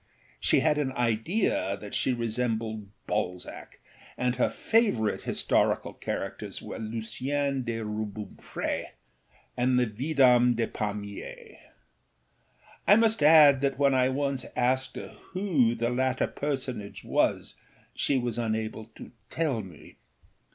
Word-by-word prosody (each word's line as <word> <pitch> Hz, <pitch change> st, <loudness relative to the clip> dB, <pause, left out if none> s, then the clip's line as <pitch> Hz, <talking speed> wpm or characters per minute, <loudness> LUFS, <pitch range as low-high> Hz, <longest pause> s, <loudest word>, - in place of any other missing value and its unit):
She -, -, +3 dB
had 150 Hz, -1 st, +2 dB
an 135 Hz, -3 st, -1 dB
idea 115 Hz, -, 0 dB
that 105 Hz, 0 st, -10 dB
she -, -, +1 dB
resembled 115 Hz, -3 st, -2 dB, 0.2 s
Balzac, 90 Hz, -4 st, -4 dB, 0.4 s
and 125 Hz, 0 st, 0 dB
her 125 Hz, -, +2 dB
favourite 205 Hz, -, +1 dB
historical -, -, +1 dB
characters -, -, -5 dB
were -, -, -7 dB
Lucien 130 Hz, +6 st, -2 dB
de 115 Hz, -1 st, -3 dB
Rubempré 105 Hz, -1 st, -4 dB, 0.7 s
and 125 Hz, +1 st, +2 dB
the 125 Hz, -, +4 dB
Vidame 125 Hz, 0 st, +3 dB
de 115 Hz, 0 st, +1 dB
Pamiers. 105 Hz, -2 st, -6 dB, 1.3 s
I 205 Hz, -, +8 dB
must 225 Hz, -4 st, +3 dB
add 145 Hz, -3 st, +7 dB
that 135 Hz, -1 st, 0 dB
when 140 Hz, -1 st, +3 dB
I 130 Hz, 0 st, +3 dB
once 135 Hz, -1 st, -1 dB
asked 130 Hz, +1 st, 0 dB
her -, -, -6 dB, 0.2 s
who 160 Hz, -, +2 dB
the 120 Hz, +1 st, -1 dB
latter 130 Hz, +1 st, +1 dB
personage 130 Hz, -7 st, -4 dB
was -, -, 0 dB, 0.4 s
she 140 Hz, -, +1 dB
was 120 Hz, -2 st, -2 dB
unable 110 Hz, -1 st, -2 dB
to -, -, -11 dB, 0.2 s
tell 150 Hz, -8 st, -1 dB
me. 90 Hz, -7 st, -13 dB
125 Hz, 125 wpm, -28 LUFS, 110-140 Hz, 1.3 s, I